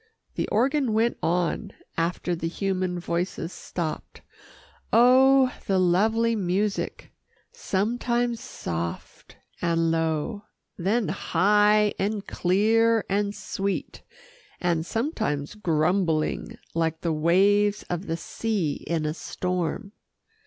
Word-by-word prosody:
The -, -, -2 dB
organ 265 Hz, +1 st, +1 dB
went 225 Hz, +2 st, +1 dB
on 180 Hz, +4 st, -1 dB, 0.2 s
after 175 Hz, +1 st, -1 dB
the 165 Hz, 0 st, -3 dB
human 185 Hz, 0 st, -2 dB
voices 170 Hz, 0 st, -3 dB
stopped 165 Hz, -3 st, -5 dB, 0.7 s
oh! 260 Hz, +2 st, +6 dB
the 195 Hz, -, +2 dB
lovely 220 Hz, +6 st, +3 dB
music 195 Hz, +1 st, -2 dB, 0.4 s
sometimes 235 Hz, +3 st, -1 dB
soft 85 Hz, -, -6 dB, 0.2 s
and 165 Hz, -1 st, +1 dB
low, 165 Hz, +6 st, -1 dB, 0.3 s
then 205 Hz, +5 st, 0 dB
high, 210 Hz, +3 st, +3 dB
and 205 Hz, +1 st, -1 dB
clear 225 Hz, +5 st, +2 dB
and 205 Hz, +1 st, 0 dB
sweet, 195 Hz, 0 st, -3 dB, 0.6 s
and 170 Hz, -2 st, 0 dB
sometimes 220 Hz, -, -2 dB
grumbling, 165 Hz, -3 st, 0 dB, 0.2 s
like 165 Hz, -1 st, -1 dB
the 165 Hz, -2 st, 0 dB
waves 200 Hz, +6 st, +3 dB
of 175 Hz, +2 st, -4 dB
the 165 Hz, 0 st, -1 dB
sea 195 Hz, -7 st, -2 dB
in 165 Hz, -2 st, -1 dB
a 150 Hz, -, -1 dB
storm. 180 Hz, +4 st, -3 dB
195 Hz, 105 wpm, -25 LUFS, 170-220 Hz, 0.7 s, oh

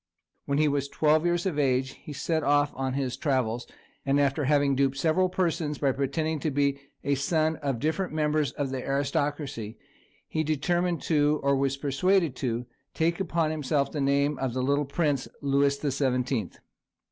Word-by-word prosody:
When 140 Hz, -, 0 dB
he 155 Hz, 0 st, +4 dB
was 140 Hz, -1 st, 0 dB
twelve 155 Hz, +3 st, +2 dB
years 175 Hz, +1 st, 0 dB
of 165 Hz, -6 st, -1 dB
age 130 Hz, -1 st, +1 dB
he 150 Hz, -, -11 dB
set 160 Hz, +3 st, -1 dB
off 145 Hz, 0 st, +2 dB
on 130 Hz, 0 st, -2 dB
his 135 Hz, -3 st, -1 dB
travels, 125 Hz, -6 st, -1 dB, 0.4 s
and 140 Hz, 0 st, +2 dB
after 140 Hz, +1 st, +1 dB
having 140 Hz, -1 st, +3 dB
duped 135 Hz, 0 st, +1 dB
several 170 Hz, +5 st, +2 dB
persons 165 Hz, -5 st, -1 dB
by 140 Hz, -2 st, +2 dB
pretending 155 Hz, +4 st, -1 dB
to 155 Hz, -, -1 dB
be 140 Hz, 0 st, +1 dB, 0.2 s
a 140 Hz, -, +1 dB
son 155 Hz, +3 st, +1 dB
of 140 Hz, -4 st, -2 dB
different 160 Hz, +6 st, -1 dB
members 150 Hz, -2 st, +1 dB
of 140 Hz, -2 st, -3 dB
the 130 Hz, -1 st, -3 dB
aristocracy, 140 Hz, -4 st, -2 dB, 0.5 s
he 155 Hz, -, -1 dB
determined 175 Hz, +3 st, 0 dB
to, 150 Hz, -1 st, +2 dB
or 140 Hz, 0 st, +3 dB
was 135 Hz, 0 st, 0 dB
persuaded 150 Hz, +3 st, +1 dB
to, 120 Hz, -1 st, -2 dB, 0.3 s
take 165 Hz, +2 st, +1 dB
upon 165 Hz, -4 st, 0 dB
himself 145 Hz, -2 st, 0 dB
the 150 Hz, -, -3 dB
name 140 Hz, +1 st, +1 dB
of 130 Hz, -2 st, -2 dB
the 130 Hz, -, 0 dB
little 140 Hz, +2 st, +1 dB
prince, 140 Hz, -2 st, 0 dB
"Louis 140 Hz, 0 st, +2 dB
the 145 Hz, -1 st, -2 dB
Seventeenth." 125 Hz, -5 st, -1 dB
145 Hz, 175 wpm, -27 LUFS, 135-155 Hz, 0.5 s, he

